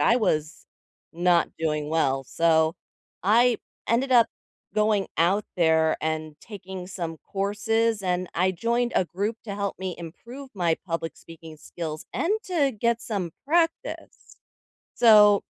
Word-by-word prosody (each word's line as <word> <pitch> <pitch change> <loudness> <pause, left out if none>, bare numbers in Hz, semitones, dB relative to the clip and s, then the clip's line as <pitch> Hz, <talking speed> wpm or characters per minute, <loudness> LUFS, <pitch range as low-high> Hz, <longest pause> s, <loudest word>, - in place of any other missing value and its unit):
I 235 - +4
was 155 -8 -1 0.5
not 175 0 +2
doing 150 -2 -1
well, 135 -4 +1
so 160 +2 +2 0.5
I 235 +4 +4 0.3
ended 255 +3 +1
up 235 -2 +6 0.5
going 210 -2 +2
out 190 +5 +2
there 160 -2 +3
and 155 -1 -3
taking 190 -4 -8
some 170 -4 -5 0.2
courses, 210 +2 0
and 180 -1 -1
I 185 +2 +2
joined 235 +6 0
a 185 - +3
group 205 +6 -3
to 200 -3 -5
help 200 -2 -3
me 185 -1 -4
improve 235 - -10
my 170 -4 +1
public 165 -2 -4
speaking 165 -1 -12
skills, 155 0 -7
and 380 - 0
to 300 -8 +1
get 235 +2 +1
some 195 -8 -3 0.2
practice. 330 +1 -1 0.6
So 210 -3 +7
190 Hz, 135 wpm, -25 LUFS, 165-225 Hz, 0.6 s, So